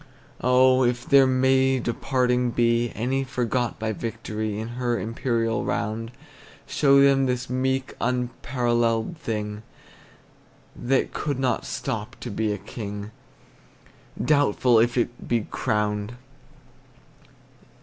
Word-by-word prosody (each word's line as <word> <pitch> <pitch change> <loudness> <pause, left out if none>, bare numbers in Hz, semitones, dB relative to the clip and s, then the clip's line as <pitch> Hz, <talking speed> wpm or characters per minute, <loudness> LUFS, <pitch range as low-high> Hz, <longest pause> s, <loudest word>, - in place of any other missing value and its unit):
Oh, 130 +1 +5
if 120 0 0
there 135 -1 +6
may 130 +1 +3
departing 125 0 0
be 120 0 +2
Any 130 +5 -1
forgot 125 -2 -1
by 110 0 -2
victory 110 -1 -4
In 110 +1 -5
her 120 -1 -1
imperial 115 0 -1
round, 110 +2 -2 0.5
Show 140 -2 +4
them 135 -1 +4
this 125 -1 -2
meek 130 +1 -1
apparelled 120 0 0
thing, 105 -5 -4 1.1
That 130 +2 0
could 145 -3 -2
not 130 -1 0
stop - - -4
to - - -5
be 110 +1 -1
a 105 - -2
king, 105 0 -7 1.1
Doubtful 130 -5 +3
if 120 +2 +2
it 120 0 -2
be 120 -1 +1
crowned! 105 -1 -1
120 Hz, 110 wpm, -24 LUFS, 115-130 Hz, 1.1 s, there